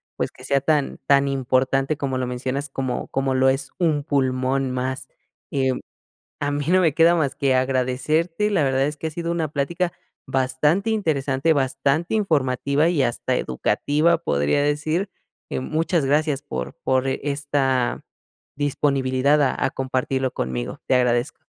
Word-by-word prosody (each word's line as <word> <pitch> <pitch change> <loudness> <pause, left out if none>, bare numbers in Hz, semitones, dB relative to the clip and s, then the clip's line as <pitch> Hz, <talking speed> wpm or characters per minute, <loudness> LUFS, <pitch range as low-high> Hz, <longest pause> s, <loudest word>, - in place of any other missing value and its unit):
pues - - -2
que 125 - -16
sea 135 +1 +1
tan 150 0 0
tan 140 0 +4
importante 135 +2 +1
como 135 -2 -2
lo 130 - -2
mencionas, 130 +3 -3
como 130 -2 -3
como 135 0 -1
lo 130 0 +4
es 135 +1 -2
un 155 -5 +1
pulmón 135 -2 0
más, 130 +1 -3 0.4
em, 130 -2 0 0.6
a 145 - 0
mí 145 0 -2
no 185 +1 +4
me 160 -4 +3
queda 165 +3 +5
más 145 -4 0
que 140 -2 +1
agradecerte, 135 +9 0
la 180 -8 +2
verdad 135 0 +1
es 150 +1 -4
que 160 - -4
ha - - -2
sido 170 +2 -4
una 165 -2 -1
plática 170 +5 -1 0.3
bastante 140 - +1
interesante, 155 -7 +1
bastante 140 +5 0
informativa 145 -5 +1
y 160 -6 +1
hasta 125 +1 0
educativa 150 - +1
podría 70 - +1
decir, 155 +6 0 0.4
eh, - - -2
muchas 160 +3 0
gracias 145 0 +1
por 65 - -5
por 130 0 +2
esta 140 -2 0 0.5
disponibilidad 140 0 +1
a 135 - +1
a - - -2
compartirlo 130 0 -1
conmigo, - - -4
te - - +2
agradezco. 125 0 0
140 Hz, 155 wpm, -23 LUFS, 130-155 Hz, 0.6 s, queda